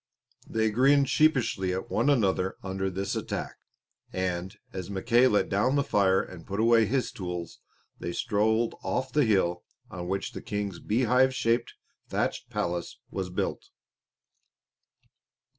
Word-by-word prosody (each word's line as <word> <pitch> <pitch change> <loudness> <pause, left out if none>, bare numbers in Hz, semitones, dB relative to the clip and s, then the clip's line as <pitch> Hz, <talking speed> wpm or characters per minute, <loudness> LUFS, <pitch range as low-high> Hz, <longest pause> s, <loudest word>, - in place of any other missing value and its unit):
They 110 -1 +1
grinned 135 +4 +4
sheepishly 120 -11 +2
at 95 - -5
one - - +2
another 95 -8 +2
under 95 0 -2
this 95 +1 -3
attack, - - -4 0.5
and, 95 +2 -3 0.2
as 95 -1 -5
Mackay 120 +6 +3
let 105 -5 +2
down 125 +8 +1
the 140 - +3
fire 95 -7 +3
and 85 -3 -11
put 100 +1 -3
away 115 -1 +5
his 130 +2 0
tools, 90 -3 -6 0.4
they 85 - -4
strolled 110 +2 +1
off 130 0 -2
to 150 - +1
the 150 - +5
hill 90 -4 +2 0.3
on 90 -1 -6
which 95 +1 -2
the - - -7
King's 105 -5 -3
beehive 125 +3 +2
shaped 115 -1 0 0.3
thatched - - -2
palace 85 0 -3
was 95 -2 -3
built. 90 - -3
105 Hz, 140 wpm, -28 LUFS, 95-120 Hz, 0.5 s, away